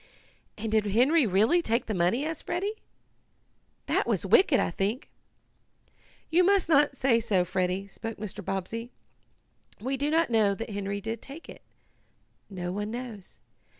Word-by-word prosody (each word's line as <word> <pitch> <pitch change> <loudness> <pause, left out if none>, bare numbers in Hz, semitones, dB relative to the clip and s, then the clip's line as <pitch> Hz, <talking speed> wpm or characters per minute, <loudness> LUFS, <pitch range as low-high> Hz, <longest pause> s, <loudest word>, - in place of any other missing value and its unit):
"And 220 0 -4
did 215 -1 +2
Henry 255 +7 +4
really 215 - +3
take 230 -5 0
the 220 - -3
money?" 185 +10 +1
asked 320 -1 -5
Freddie. 405 +5 -2 1.0
"That - - 0
was - - 0
wicked, 325 -8 +5
I - - 0
think." 205 - -2 1.2
"You 350 +3 +5
must 390 -1 +3
not 290 -3 +3
say 245 -3 +3
so, 195 -5 +1
Freddie," 185 +1 -1
spoke 225 +3 -7
Mr. 205 0 -7
Bobbsey. 195 +5 -4 0.9
"We 260 +5 -2
do 285 +2 0
not 325 -3 +2
know 210 -3 +3
that 225 +1 -6
Henry 200 0 -3
did 225 +2 -4
take 285 +5 -10
it. - - -11 0.9
No 180 -3 -4
one 205 +2 -3
knows. 230 -5 -8
225 Hz, 150 wpm, -28 LUFS, 200-280 Hz, 1.2 s, wicked